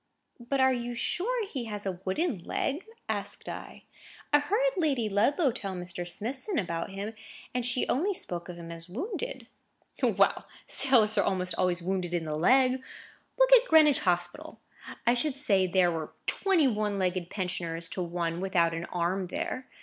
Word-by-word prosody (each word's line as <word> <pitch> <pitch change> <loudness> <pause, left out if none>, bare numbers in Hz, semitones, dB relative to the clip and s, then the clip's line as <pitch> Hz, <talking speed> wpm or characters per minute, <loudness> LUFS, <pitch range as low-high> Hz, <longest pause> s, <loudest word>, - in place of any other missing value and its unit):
"But 245 +3 -2
are 260 0 +5
you 240 -1 -3
sure 430 - -1
he 265 -11 -5
has 210 -2 -5
a 185 -2 -3
wooden 220 - 0
leg?" 290 - -3 0.2
asked - - -4
I. - - -8 0.5
"I 295 - +7
heard 425 +12 +1
Lady 285 - +1
Ludlow 260 - +2
tell 195 -4 -4
Mr. 175 0 -5
Smithson 255 - -2
about 170 -6 -2
him, 200 +3 -5 0.4
and 250 0 -1
she 245 +1 +2
only 370 +9 +1
spoke 175 - -5
of 175 - -6
him 170 -1 -9
as 165 +1 -6
wounded." 400 - -4 0.6
"Well, - - +2 0.2
sailors 240 -5 +4
are - - +4
almost 185 -2 0
always 180 -1 0
wounded 180 -1 -1
in 165 -2 -2
the 155 -1 -3
leg. 255 - +4 0.6
Look - - +5
at - - +7
Greenwich 305 -4 +6
Hospital! 180 - -2 0.5
I 240 - +5
should 260 +3 0
say 200 -10 +2
there 180 -1 +3
were 160 -2 -5
twenty 370 -7 +3
one 210 -3 0
legged 180 -2 -1
pensioners 170 -3 -2
to 185 - -3
one 170 -1 -2
without 170 -3 +2
an 165 +1 -4
arm 180 +2 -1
there. 255 +7 -4
210 Hz, 170 wpm, -29 LUFS, 175-275 Hz, 0.6 s, I